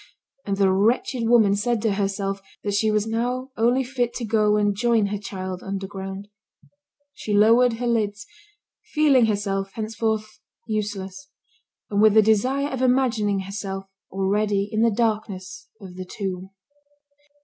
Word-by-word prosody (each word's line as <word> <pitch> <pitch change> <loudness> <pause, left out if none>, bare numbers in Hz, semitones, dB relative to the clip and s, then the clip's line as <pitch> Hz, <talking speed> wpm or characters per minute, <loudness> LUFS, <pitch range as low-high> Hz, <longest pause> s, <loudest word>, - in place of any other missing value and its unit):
And 200 -1 -1
the 195 -1 +3
wretched 230 +4 +1
woman 220 -4 +5
said 230 +3 0
to 220 -3 +2
herself 195 0 -2 0.2
that 205 - -2
she 215 +2 +2
was 210 0 +1
now 245 +4 -2
only 240 +4 +2
fit 245 -2 -2
to 240 - -3
go 210 -1 +2
and 205 -1 +1
join 230 0 +2
her 205 +1 -2
child 185 -2 -6
underground. 195 0 -6 0.9
She 210 -6 -3
lowered 230 +4 +5
her 240 +2 -4
lids, 210 -3 -1 0.6
feeling 280 -6 +3
herself, 195 -2 -2
henceforth, 220 -1 -3 0.3
useless, 195 -3 -4 0.6
and 205 0 +2
with 215 -1 +5
the 220 - +7
desire 255 +7 +2
of 265 -2 -4
imagining 245 -6 +2
herself 195 0 -5 0.2
already 200 +1 0
in 215 -1 0
the 230 - +5
darkness 215 -3 -2
of 190 -4 -11
the 185 0 -6
tomb. 190 -1 -5
210 Hz, 145 wpm, -23 LUFS, 195-230 Hz, 0.9 s, the